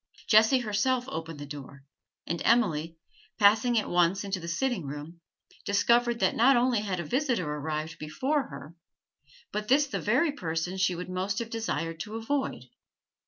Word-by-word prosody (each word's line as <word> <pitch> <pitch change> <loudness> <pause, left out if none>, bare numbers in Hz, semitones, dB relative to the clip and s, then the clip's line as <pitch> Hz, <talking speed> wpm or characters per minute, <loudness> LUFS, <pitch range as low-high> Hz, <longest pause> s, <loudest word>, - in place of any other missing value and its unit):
Jessie 220 +4 +5
herself 240 +3 0
opened 160 - -5
the 145 - -7
door, 140 -1 -10 0.4
and 170 - -3
Emily; 165 -9 +2 0.4
passing 220 +3 +4
at 215 - +1
once 175 +3 +2
into 195 -1 -3
the 170 - -8
sitting 180 - -1
room, 150 +4 -8 0.4
discovered 235 +4 +2
that - - +2
not 255 +3 +5
only 245 -2 +2
had 195 -4 -3
a - - -2
visitor 245 - 0
arrived 155 +2 -4
before 265 - -1
her, 140 +3 -10 0.8
but 210 0 -3
this 285 +4 +4
the 280 - -4
very 265 +9 +2
person 170 - -3
she 185 -1 +2
would 180 +1 -6
most 185 +2 -2
have 230 -1 -4
desired 165 -8 -3
to 215 +5 -6
avoid. 265 +5 -2
200 Hz, 165 wpm, -28 LUFS, 165-240 Hz, 0.8 s, Jessie